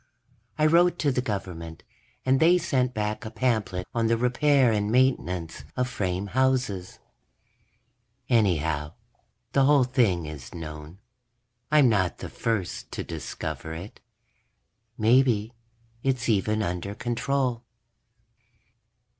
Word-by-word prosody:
I 155 - +3
wrote 175 +3 +4
to 145 - +1
the 125 - 0
Government, 90 -7 -5 0.4
and 130 0 +3
they 170 +4 +6
sent 135 -8 0
back 105 -2 -3
a 110 - -5
pamphlet 110 -7 -1
on 115 -1 +1
the 115 0 +2
repair 125 +1 +3
and 105 -1 0
maintenance 90 - +1
of 125 0 +1
frame 95 -4 -2
houses. 125 -8 0 1.3
Anyhow, 80 -9 +1 0.6
the 135 +1 +3
whole 145 -1 +5
thing 115 -10 +1
is 75 -1 -9
known; 75 +1 -8 0.7
I'm 150 -3 +5
not 95 -6 +1
the - - -7
first 110 -6 -3
to - - -3
discover 80 +1 -6
it. 90 +6 -9 1.0
Maybe 115 -1 +3 0.5
it's 130 -2 0
even 110 0 +1
under 90 +2 -3
control. 125 +1 -1
110 Hz, 115 wpm, -26 LUFS, 90-130 Hz, 1.3 s, they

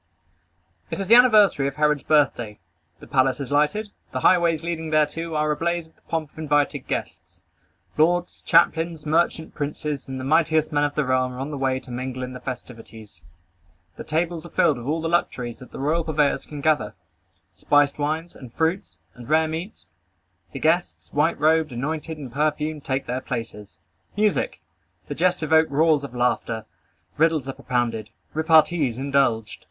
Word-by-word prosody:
It - - -4
is 195 - -3
the - - +7
anniversary 215 - +6
of 140 - -4
Herod's 150 -1 +2
birthday. 120 -8 +1 0.4
The - - -12
palace 130 -1 +1
is 140 -1 -5
lighted. 175 +9 +1 0.2
The - - -3
highways 170 -3 +3
leading 165 -1 -3
thereto 155 +2 0
are 150 0 +1
ablaze 170 +2 -1
with 160 - -25
the - - -32
pomp 160 -3 -3
of - - -15
invited 145 -2 0
guests. - - -6 0.6
Lords, 175 +3 +1
captains, 165 -1 +3
merchant 160 +1 0
princes, 150 -1 -4
and 130 -1 -5
the - - -5
mightiest 155 +2 +2
men 145 -1 +1
of 145 - -3
the 150 - +1
realm 130 0 +1
are 125 - -8
on 140 +3 -4
the 145 - -4
way 130 -1 0
to 130 - -13
mingle 130 +1 -4
in 125 0 -6
the 125 - -8
festivities. 115 -5 -9 0.7
The - - -8
tables 165 +1 -2
are 170 - -10
filled 150 -7 +2
with 120 - -8
all 160 +2 0
the 165 - -2
luxuries 125 -8 -1
that 130 - -13
the - - -9
royal 155 +5 0
purveyors 150 -3 0
can 150 -2 -7
gather, 145 -9 +1 0.6
spiced 145 +9 +2
wines, 155 +4 -2
and 130 -3 -11
fruits, 160 - -2
and 120 -2 -12
rare 160 +1 +3
meats. 165 +6 -7 0.6
The - - -7
guests, 170 +3 0
white 150 +3 +1
robed, 155 0 +3
anointed 155 +6 -4
and 135 -5 -9
perfumed, 150 0 -1
take 135 0 -2
their 125 +2 -3
places. 105 - -6 0.4
Music! 210 0 0 0.5
The - - -4
jests 180 -2 +1
evoke 160 +1 +4
roars 150 +1 +3
of 130 -3 -8
laughter. 115 -2 -1 0.5
Riddles 160 -3 +2
are 135 - -3
propounded. 115 -5 -2 0.2
Repartees 160 -4 +3
indulged. 130 -6 0
150 Hz, 175 wpm, -23 LUFS, 130-160 Hz, 0.7 s, the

